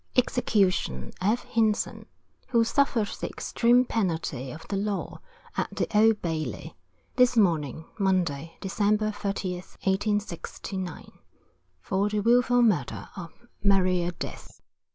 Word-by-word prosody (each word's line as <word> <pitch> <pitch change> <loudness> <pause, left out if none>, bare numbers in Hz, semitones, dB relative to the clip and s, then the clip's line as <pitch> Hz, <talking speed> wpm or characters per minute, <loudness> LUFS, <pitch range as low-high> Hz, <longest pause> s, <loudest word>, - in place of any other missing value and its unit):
EXECUTION 195 - +1
F. 215 +6 +1
HINSON, 220 -1 0 0.4
Who 235 -3 +3
suffered 230 -3 +1
the - - -5
extreme 245 +2 +2
penalty 165 - -2
of 160 +3 -10
the 200 - -2
law, 200 0 -3 0.3
at - - -2
the - - +1
Old 220 0 +4
Bailey, 155 -8 -3 0.4
this 250 -1 +4
morning, 160 - +2
Monday, 170 -5 0
December, 210 +2 +1
13th, 195 -3 -4
1869, 190 -2 -2 0.7
for 195 - 0
the 210 0 0
Wilful 245 +2 +4
Murder 145 - 0
of 175 -3 -7 0.3
Maria 185 -3 +3
Death. - - -8
195 Hz, 110 wpm, -27 LUFS, 170-220 Hz, 0.7 s, Old